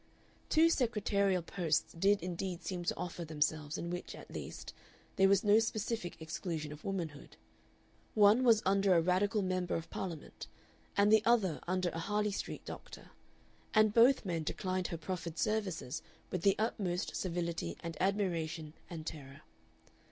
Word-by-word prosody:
Two 330 +1 +5
secretarial 200 - +1
posts 170 -3 0
did 195 +2 +2
indeed 180 0 -4
seem 180 -2 -3
to - - 0
offer 175 -1 -4
themselves 155 -1 -1
in 170 - -4
which, 175 - -5
at - - -12
least, - - -7 0.4
there 195 0 +5
was 195 -1 +4
no 210 +1 +6
specific 220 -4 -2
exclusion 160 -1 -4
of 150 0 -10
womanhood; 170 -7 -5 0.8
one 210 +4 +6
was 230 -3 +5
under 195 -1 +4
a 165 - +5
Radical 200 +4 +2
Member 185 -1 -1
of 165 - -5
Parliament, 170 -6 -6 0.5
and 205 +1 +5
the 220 -1 +6
other 220 -9 +3
under 185 0 +1
a 165 - -5
Harley 210 +4 0
Street - - -5
doctor, - - -9 0.6
and 215 -1 +5
both 240 +2 +5
men 170 -3 -1
declined 185 +3 -2
her 170 - -4
proffered 170 -1 -5
services 195 - -1 0.3
with 180 - -2
the 195 +2 +4
utmost 195 -5 -1
civility 170 - -2
and 165 -1 -4
admiration 170 -5 -1 0.2
and 160 -3 -7
terror. 140 -3 -8
185 Hz, 150 wpm, -34 LUFS, 165-205 Hz, 0.8 s, no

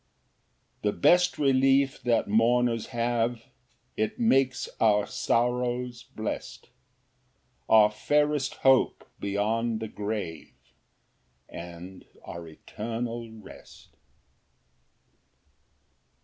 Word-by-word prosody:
4 105 - +1
The - - -14
best 175 - +4
relief 135 -1 +3
that 120 -2 +1
mourners 115 +2 +2
have, 120 -1 -1 0.5
It 110 - -2
makes 135 - +2
our 105 -2 +3
sorrows 125 0 -1
blest; 110 -4 -6 1.0
Our 105 -1 +6
fairest 145 +5 0
hope 135 -1 +3
beyond 110 +3 -1
the 110 - -4
grave, 105 -6 -5 0.9
And 85 +2 -9 0.2
our 85 -1 -8
eternal 115 +7 -6
rest. 110 -1 -15
115 Hz, 80 wpm, -27 LUFS, 105-125 Hz, 1.0 s, Our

